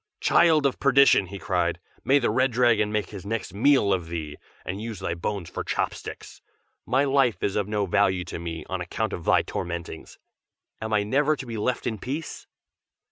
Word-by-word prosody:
"Child 160 -4 +4
of 135 - 0
perdition!" 140 -7 +5
he 100 +2 -7
cried, 90 -3 -1 0.2
"may 135 +4 +4
the 125 - +1
Red 130 0 +2
Dragon 115 -3 +3
make 105 -1 -2
his 100 -3 -8
next 100 -2 -4
meal 115 -2 +3
of 90 -3 -2
thee, 80 -3 -5 0.3
and 95 +3 -4
use 110 -4 -6
thy 85 - -2
bones 85 +1 -4
for - - -5
chopsticks! - - -4 0.5
my 130 +4 +3
life 135 -7 +2
is 100 - 0
of 105 -2 0
no 105 -1 0
value 95 -1 +2
to - - -7
me, 80 -1 -6
on 95 -1 -3
account 105 +4 -3
of 85 - -6
thy - - +4
tormentings. 85 -2 -6 0.6
Am 110 0 -4
I 105 -1 +2
never 145 +8 +2
to 135 - -8
be 115 -2 -6
left 125 +4 -1
in 110 -3 -2
peace?" 145 +9 -6
105 Hz, 190 wpm, -25 LUFS, 90-130 Hz, 0.6 s, perdition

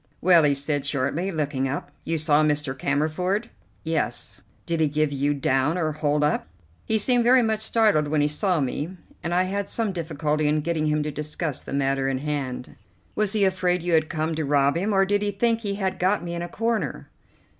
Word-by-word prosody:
"Well," 175 -1 +6
he 145 -2 +3
said 145 0 -1
shortly, 145 +6 -1
looking 145 -5 -1
up; 145 +1 -4
"you 165 0 0
saw 150 -1 +3
Mr. 150 -3 0
Cammerford?" 160 - -1 0.3
"Yes." 125 -7 -2 0.2
"Did 170 -1 -1
he 160 - +3
give 145 -1 0
down 135 +7 +1
or 160 -3 0
hold 150 -1 0
up?" 150 - 0 0.4
"He 220 - +2
seemed 245 +3 +3
very 250 +1 +5
much 220 -1 0
startled 215 -8 +2
when 150 0 +1
he 145 - +3
saw 175 +4 +1
me, 150 +7 -3 0.2
and 170 - -3
I 180 +1 +3
had 195 +1 -3
some 225 -3 -1
difficulty 155 -3 -1
in 150 +1 +2
getting 155 -1 -1
him 150 0 +1
to 150 - -3
discuss 150 0 -3
the - - -10
matter 135 -1 0
in 135 - -1
hand." 135 -3 -4 0.4
"Was 215 -1 0
he 210 -2 +3
afraid 180 -2 +1
you 175 -1 0
had 155 -1 +3
come 160 0 -1
to 160 0 -2
rob 140 0 +2
him, 195 +6 0
or 195 -1 +4
did 205 +1 +1
he 205 - 0
think 230 +3 0
he 200 -3 -2
had 190 -2 -2
got 190 +2 +1
me 170 0 -5
in 170 - -3
a 175 - -5
corner?" 230 +3 -2
155 Hz, 210 wpm, -24 LUFS, 145-190 Hz, 0.4 s, Well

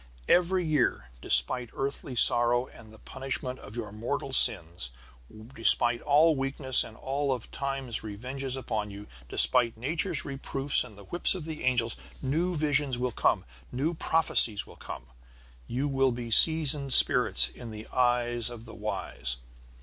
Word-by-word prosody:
Every 180 0 +2
year, 130 - -1
despite 85 - +3
earthly 135 -1 -5
sorrow 120 +1 +4
and 110 -4 -17
the 110 - -16
punishment 130 +1 -7
of 105 - -13
your 110 -4 -6
mortal 120 +5 -5
sins, 85 - +4 0.6
despite 120 0 +3
all 155 +3 +3
weakness 135 -1 +2
and 110 - -12
all 140 +2 -3
of 125 -4 -5
Time's 135 -4 -5
revenges 130 +5 -5
upon 110 -5 -4
you, 100 +1 -11 0.2
despite 120 -3 +3
Nature's 145 +7 -3
reproofs 135 0 +1
and 110 -5 -14
the 100 - -13
whips 175 - +1
of 175 -5 -7
the 160 -1 -8
angels, 120 -3 -1 0.2
new 165 +7 -2
visions 145 -4 0
will 125 0 -3
come, - - 0 0.3
new 140 +7 -2
prophecies 155 -10 +2
will - - -16
come. - - -10 0.6
You 130 +4 -3
will 135 -2 0
be 120 -1 -7
seasoned 150 -1 +5
spirits - - +4
in 120 -2 -11
the 110 0 -9
eyes 120 -1 0
of 120 -1 -11
the 115 - -12
wise. 65 - -3
125 Hz, 150 wpm, -27 LUFS, 115-140 Hz, 0.6 s, seasoned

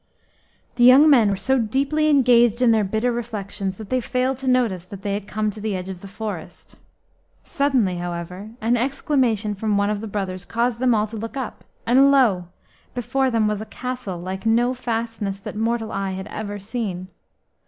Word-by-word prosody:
The 240 - +3
young 270 +5 +8
men 235 -7 +5
were 200 - +1
so 265 +7 +1
deeply 275 +7 +1
engaged 240 -5 +4
in 250 -2 +4
their 220 -2 +3
bitter 220 +5 0
reflections 205 -5 -4
that 220 0 -10
they 255 0 +2
failed 255 +2 -1
to 265 - -6
notice 235 -8 +1
that 195 +1 -10
they 200 - -1
had 200 0 -4
come 215 0 -1
to 210 - -10
the 210 -2 -2
edge 185 0 -5
of 190 -2 -6
the 200 - -9
forest. 200 -4 -7 0.6
Suddenly, 255 -11 +1
however, 175 +3 -5
an 235 +2 +2
exclamation 245 -4 0
from 205 +1 -1
one 200 +1 +1
of 210 -1 -3
the 220 - -5
brothers 190 -3 -4
caused 235 0 -1
them 250 -2 +3
all 210 0 +2
to 220 +1 -8
look 225 +5 -6
up, 260 -4 -5 0.2
and 265 +4 +5
lo! 225 -11 +3 0.5
before 260 +2 0
them 225 -3 +2
was 210 0 -1
a - - -5
castle 250 -7 -5
like 185 +2 -6
no 235 +3 +2
fastness 225 -5 -3
that - - -7
mortal 225 0 -1
eye 195 -1 -2
had 190 0 -5
ever 205 -1 -5
seen. 195 -3 -4
220 Hz, 195 wpm, -22 LUFS, 200-250 Hz, 0.6 s, young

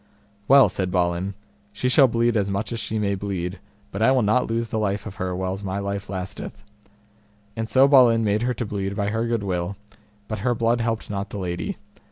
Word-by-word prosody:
Well, 135 -3 +7
said 95 -1 -2
Balin, 90 +1 0 0.4
she 105 +5 -2
shall 130 +2 +6
bleed 115 0 +1
as 100 -2 +1
much 100 +4 -2
as 115 - -3
she 110 - -2
may 100 -2 0
bleed, 95 -2 -4 0.3
but 100 - -5
I 115 - +5
will 130 -3 +3
not 110 +5 +2
lose 115 0 -2
the 110 - -1
life 100 -1 -1
of 100 -3 -8
her 90 0 -2
whiles 95 +1 -3
my 95 -1 -3
life 100 0 -4
lasteth. 95 +1 -6 0.9
And 110 0 -3
so 135 +1 +5
Balin 125 -5 +6
made 105 0 +1
her 125 +1 0
to 120 - -3
bleed 100 -1 -3
by 100 -1 -1
her 115 +2 -1
good 115 -3 -1
will, 90 0 -2 0.5
but 110 -1 -4
her 120 +3 0
blood 115 +1 +1
helped 115 -2 -2
not 100 0 -3
the - - -6
lady. 85 -3 -3
105 Hz, 215 wpm, -23 LUFS, 95-115 Hz, 0.9 s, Well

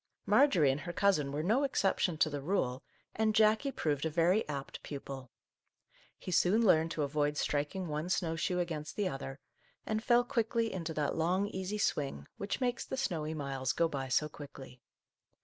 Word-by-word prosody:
Marjorie 180 - +5
and 140 +3 -3
her 175 -1 -5
cousin 165 -9 +2
were 150 +2 -2
no 225 - +2
exception 195 - +1
to 155 - +4
the 145 -2 -4
rule, 135 -6 -1 0.3
and 215 -1 +1
Jackie 220 +6 +4
proved 145 - -1
a 160 - +1
very 170 +5 +2
apt 140 -2 -5
pupil. 135 -3 -7 0.9
He 185 - -7
soon 195 +6 +3
learned 160 -4 +4
to 155 - -1
avoid 145 +1 0
striking 150 +7 -1
one 155 +3 -3
snow 170 -3 0
shoe 180 +2 -1
against 160 -4 -3
the 205 -2 0
other, 135 -3 -5 0.5
and 215 0 -1
fell 240 0 +4
quickly 230 -2 0
into 165 -3 -4
that 150 -2 0
long, 180 +5 +1
easy 190 +2 -3
swing, 140 - -1
which 200 0 -3
makes 245 -2 0
the 265 - -5
snowy 160 -11 -2
miles 135 -3 -2
go 170 - +2
by 135 -4 -4
so 150 +4 +2
quickly. 135 -4 -11
165 Hz, 180 wpm, -32 LUFS, 145-200 Hz, 0.9 s, Marjorie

